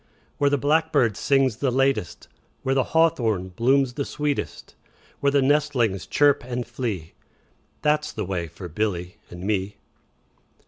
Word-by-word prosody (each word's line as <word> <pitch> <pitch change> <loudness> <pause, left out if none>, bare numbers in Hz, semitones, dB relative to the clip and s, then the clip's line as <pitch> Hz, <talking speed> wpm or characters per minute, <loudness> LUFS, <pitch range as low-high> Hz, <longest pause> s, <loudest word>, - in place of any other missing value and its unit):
Where 145 - +4
the 145 - +2
blackbird 145 -5 +2
sings 135 0 +2
the 135 +1 0
latest, 135 - 0
5 - - -37 0.2
Where 135 - +1
the 135 -1 +2
hawthorn 115 - +1
blooms 125 +6 +2
the 140 - -2
sweetest, 145 0 -3 0.5
Where 140 - +2
the 140 -1 +3
nestlings 135 -8 +1
chirp 145 -1 +3
and 125 0 -4
flee, 110 -9 -4 0.7
That 150 0 +3
's - - -6
the 105 - -4
way 90 -3 -3
for 90 +3 -9
Billy 90 +1 -3
and 90 +1 -9
me. 100 -1 -1
125 Hz, 150 wpm, -24 LUFS, 100-140 Hz, 0.7 s, Where